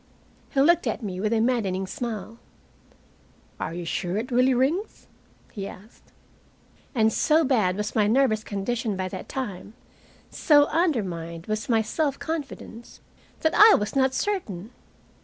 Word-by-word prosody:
He 275 - -1
looked 340 +5 +4
at - - -2
me 185 -3 -4
with 215 +2 -1
a 230 - +2
maddening 215 -6 0
smile. 225 +2 -6 1.2
"Are - - -3
you 175 0 -5
sure 175 +3 -2
it 235 +4 -4
really 255 +1 +3
rings?" 305 - -1 0.5
he 195 -2 -5
asked. 205 +5 -14 0.9
And 220 -2 +3
so 315 +1 +3
bad 215 -10 +1
was 210 0 -3
my 215 -3 +2
nervous 220 -2 +2
condition 210 +1 -3
by 185 0 -2
that 185 0 -8
time, 210 -5 -5 0.6
so 290 -2 +4
undermined 185 - -1
was 215 +2 -3
my 225 -2 +3
self 280 +5 -1
confidence, 280 -7 -7 0.4
that 315 - +2
I 430 0 +8
was 210 +4 -2
not 265 -1 +2
certain! 225 - -3
225 Hz, 145 wpm, -25 LUFS, 200-270 Hz, 1.2 s, I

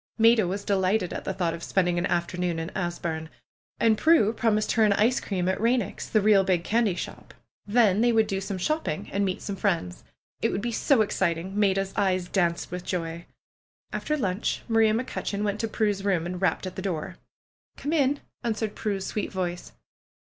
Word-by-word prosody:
Maida 225 -3 +5
was 195 +3 -3
delighted 190 -1 +1
at - - -5
the - - -1
thought 175 -3 0
of 170 - -7
spending 175 -1 +1
an 175 - 0
afternoon 175 0 -1
in 165 +2 -4
Asburne. 170 -3 -3 0.5
And 225 -2 +3
Prue 315 -10 +4
promised 215 -2 +1
her 225 - +3
an 210 -2 +5
ice 230 +5 +3
cream 185 -3 -2
at 190 - 0
Eeineck's, 235 +3 0
the 215 - +3
real 200 -1 +5
big 185 -3 +1
candy 220 -2 +1
shop. - - -8 0.3
Then 210 -2 +4
they 240 0 +4
would 220 -1 +4
do 195 -2 -2
some 195 0 -4
shopping 305 - -2
and 200 - 0
meet 185 -2 -2
some 200 - -4
friends. 175 - -1 0.4
It - - +1
would - - -1
be 235 +2 -2
so 230 0 +3
exciting 180 -3 -1
1 205 - -3
Maida's 195 -1 +1
eyes 185 -3 +1
danced 170 -4 0
with 180 0 -5
joy. 170 -1 -4 0.7
After 305 - -1
lunch 195 -5 -1
Maria 225 -2 +4
McCutcheon 210 -3 -3
went 210 0 -1
to 225 - -1
Prue's 210 -3 0
room 185 -5 +1
and 180 +1 -5
rapped 190 - +1
at 185 - -6
the - - -4
door. 180 -5 -4 0.6
^^Come 290 +3 -3
in 285 -2 +2
!" - - -47
answered 220 -2 -1
Prue's 200 -3 -3
sweet 210 - -3
voice. 180 -2 -4
195 Hz, 200 wpm, -26 LUFS, 180-220 Hz, 0.7 s, Maida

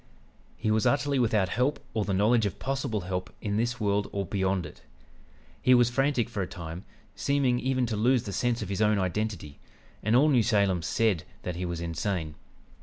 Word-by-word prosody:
He 110 -1 0
was 110 -1 +2
utterly 140 -1 +1
without 105 -6 +2
help 125 +8 0
or 110 -2 0
the 100 - -2
knowledge 105 +3 +3
of 95 - -6
possible 135 -6 -2
help 90 0 -4
in 100 -1 -2
this 120 +2 -1
world 100 -1 0
or 100 -1 -2
beyond 95 -1 0
it. 75 - -11 0.8
He 125 - +5
was 120 -1 +4
frantic 135 -2 +1
for 110 -4 -4
a 90 - -2
time, 85 +1 -8 0.3
seeming 135 -3 +1
even 130 0 0
to 115 -2 -2
lose 120 +3 +2
the 100 - -6
sense 120 +4 0
of - - -7
his 100 +1 -2
own 105 -1 +3
identity, 95 -5 -3 0.4
and 110 +3 +2
all 145 +5 +5
New 130 -5 +4
Salem 100 -5 +2
said 95 0 +1 0.2
that 90 - -3
he 90 +1 -3
was 85 -1 -4
insane. 85 -1 -2
105 Hz, 195 wpm, -28 LUFS, 95-120 Hz, 0.8 s, He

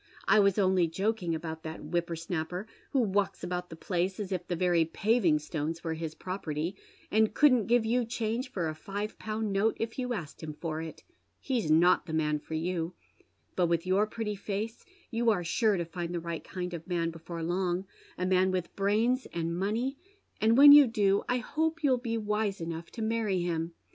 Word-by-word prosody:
I 215 - +6
was 200 -1 +4
only 185 -3 +3
joking 190 0 -1
about 160 0 -5
that 160 0 -7
whipper 170 +2 -1
unapper, 170 +3 -4 0.2
who 270 - +2
walks 205 -3 0
about 180 0 -3
the 165 - -8
place 180 +3 -2
as 200 -2 -4
if 180 -2 -3
the 175 - -1
very 175 -1 +3
paving 185 0 +2
stones 155 +2 -4
were 165 -1 -1
his 160 -1 -5
property, 175 -2 -4 0.4
and 220 0 +3
couldn't 255 -7 +5
give 235 -1 +3
you 240 +2 +2
change 230 +2 -2
for 175 -8 -1
a 155 - -2
five 205 +6 -5
pound 215 -1 -2
note 205 +3 +2
if 225 +2 -3
you 250 -1 -2
asked 175 -10 -5
him 155 -2 -6
for 160 0 -4
it. 160 -1 -8 0.4
He's 245 - -1
not 170 +4 +4
the 160 - -5
man 150 -1 +1
for 160 - -6
you. 170 +1 -2 0.6
But 180 -2 +3
with 170 0 0
your 195 +3 +2
pretty 215 -1 -3
face 205 +3 -4 0.3
you 235 0 +2
are 200 -5 +2
sure 210 +4 +2
to 170 - -2
find 170 +1 -5
the - - -1
right 170 -1 -5
kind 180 -1 -5
of 170 0 -7
man 170 -2 0
before 165 0 -7
long, 180 +2 -1 0.3
a 180 - -1
man 185 0 +3
with 185 -2 -3
brains 220 +6 +1
and 170 0 -2
money, 225 +9 -1 0.4
and 225 +2 +4
when 285 +1 +11
you 290 -2 +10
do 205 -3 +2
I 250 - +2
hope 320 +6 -1
you'll 265 -3 +4
be 230 -2 -2
wise 210 -2 -1
enough 165 0 -5
to 225 - -4
many 220 -5 0
him. 165 -1 -2
185 Hz, 200 wpm, -30 LUFS, 165-220 Hz, 0.6 s, when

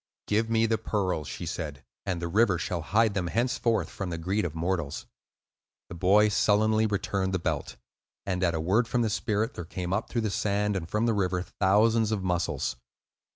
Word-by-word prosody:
"Give 110 +2 +1
me 115 0 +3
the 110 -1 +1
pearls," 95 -8 -1
she - - -6
said, 75 -3 -5 0.2
"and 90 -3 -1
the 85 - -3
river 100 +1 +3
shall 85 +2 -3
hide 105 +6 +2
them 95 -3 -1
henceforth 115 -2 0
from 95 0 -5
the 85 - -3
greed 95 +5 -1
of 80 -2 -4
mortals." 85 -3 -2 0.8
The - - -7
boy 100 +5 +4
sullenly 110 +2 +3
returned 100 -2 -1
the - - +2
belt; 85 - -3 0.5
and, 95 -1 -1
at 85 -2 +2
a - - -1
word 100 +9 +2
from 120 0 +1
the 110 - 0
spirit, 110 +1 -1
there 90 - -6
came 90 +2 -4
up 105 +3 -1
through 115 - -1
the 110 -2 -1
sand 105 0 0
and 85 -3 -4
from 105 +4 +1
the 115 - +2
river 90 -3 0
thousands 110 +4 +2
of 105 -3 -1
mussels. 90 -8 -1
100 Hz, 200 wpm, -28 LUFS, 90-110 Hz, 0.8 s, boy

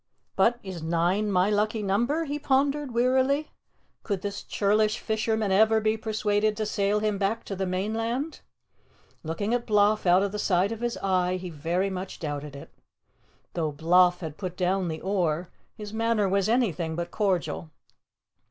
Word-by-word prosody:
"But 230 +5 +3
is 190 -4 -6
NINE 175 +6 +1
my 185 +2 +3
lucky 210 +1 0
number?" 240 +11 +1
he 295 0 -3
pondered 280 0 +1
wearily. 260 +5 +2 0.5
Could 200 -4 -3
this 205 0 -4
churlish 215 +2 +1
fisherman 220 -2 -1
ever 220 +3 +5
be 215 0 +1
persuaded 215 -1 0
to 215 - -1
sail 210 0 0
him 210 -2 0
back 210 +3 0
to 195 - -5
the 190 0 -2
mainland? 225 - -2 0.8
Looking 200 +8 -2
at 245 -1 -1
Bloff 210 -2 +3
out 180 +2 +5
of 200 - -1
the 210 - -4
side 190 +1 +2
of 225 0 -5
his 240 -1 -2
eye, 185 -1 +1
he 180 -1 -7
very 170 +6 -1
much 185 0 -5
doubted 145 -2 -5
it. 140 - -11 0.8
Though 160 -3 -1
Bloff 175 +4 +3
had 155 -3 -6
put 185 -3 -5
down 185 0 +1
the 160 -1 -4
oar, 180 -3 -1 0.2
his 210 0 -8
manner 225 -2 +1
was 195 +1 +1
anything 180 - 0
but 170 +1 -4
cordial. 165 - -1
200 Hz, 165 wpm, -26 LUFS, 180-220 Hz, 0.8 s, ever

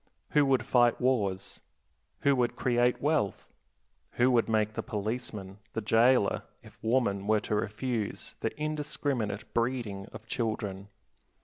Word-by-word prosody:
Who 150 -2 +4
would 130 -3 +2
fight 120 -2 +4
wars? 105 -7 0 0.6
Who 140 -1 +4
would 120 -1 +1
create 120 0 +1
wealth? 145 -10 0 0.7
Who 125 +2 +3
would 115 -2 +3
make 110 -1 +2
the - - -2
policeman, 105 -3 -4
the 115 - -2
jailer, 115 +1 +4 0.2
if - - -17
woman 110 -4 +1
were 110 -1 +3
to 105 - -3
refuse 110 +1 -2
the - - 0
indiscriminate 145 -8 -2
breeding 115 -5 -1
of 110 - -10
children? 110 -5 -3
115 Hz, 130 wpm, -30 LUFS, 105-130 Hz, 0.7 s, Who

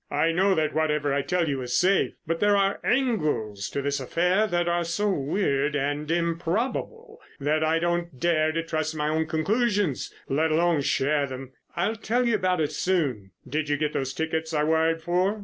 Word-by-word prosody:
I 155 +3 +1
know 190 +3 +3
that 155 -1 0
whatever 150 -2 +1
I 140 - +1
tell 175 +3 0
you 135 -3 -1
is 125 -1 -1
safe, 190 +2 +2
but 165 +1 -2
there 205 0 +4
are 195 0 +1
angles 150 - 0
to 140 - -3
this 140 0 -1
affair 180 - +1
that 175 -2 0
are 175 0 +1
so 200 +5 0
weird 145 -2 0
and 145 +2 -2
improbable 180 - -2 0.2
that 150 +2 +1
I 160 +1 +2
don't 170 -4 -2
dare 155 0 +2
to 165 +1 -2
trust 155 -1 -2
my 150 0 -1
own 160 +1 0
conclusions, 195 - 0 0.2
let 155 +4 +1
alone 165 -1 +2
share 140 +1 +1
them. 130 0 -8 0.2
I'll 205 +6 0
tell 240 +3 0
you 235 - +2
all 215 - +2
about 185 -2 +1
it 150 - 0
soon. 140 - -1 0.2
Did 150 +3 -2
you 145 - +1
get 150 0 -1
those 135 -1 -2
tickets 160 +2 -2
I 150 - +2
wired 160 +1 +1
for?" 185 +5 +1
160 Hz, 195 wpm, -26 LUFS, 145-180 Hz, 0.2 s, there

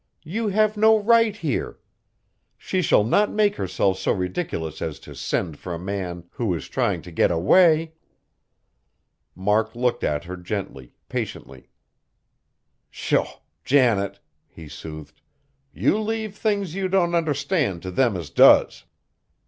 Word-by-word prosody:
You 215 +8 -2
have 215 +1 +1
no 220 +1 +5
right 230 0 +3
here! 155 - -3 0.8
She 185 - -2
shall 105 - +3
not 205 - +2
make 210 -1 +1
herself 95 +1 0
so - - 0
ridiculous 90 - -3
as 75 -3 -4
to - - -11
send 80 -5 -3
for 90 -2 -5
a - - -5
man 90 -1 -5
who 110 -7 -2
is 80 - -7
trying - - -1
to 90 - -11
get 80 - +2
away!" 160 - +4 1.4
Mark 105 +4 0
looked 125 0 -1
at 75 0 -1
her 90 +2 -7
gently, 90 - -6
patiently. 65 -1 -6 1.2
"Sho! - - 0 0.4
Janet," 120 -8 +2 0.3
he 80 -2 -13
soothed, 75 0 -10 0.5
"you 210 - +1
leave 220 -1 -3
things 200 -5 -1
you 195 0 -2
don't 180 -2 +1
understand 150 - 0
t' 95 - -5
them 115 0 +1
as 80 -5 -8
does. - - +5
120 Hz, 135 wpm, -23 LUFS, -, 1.4 s, no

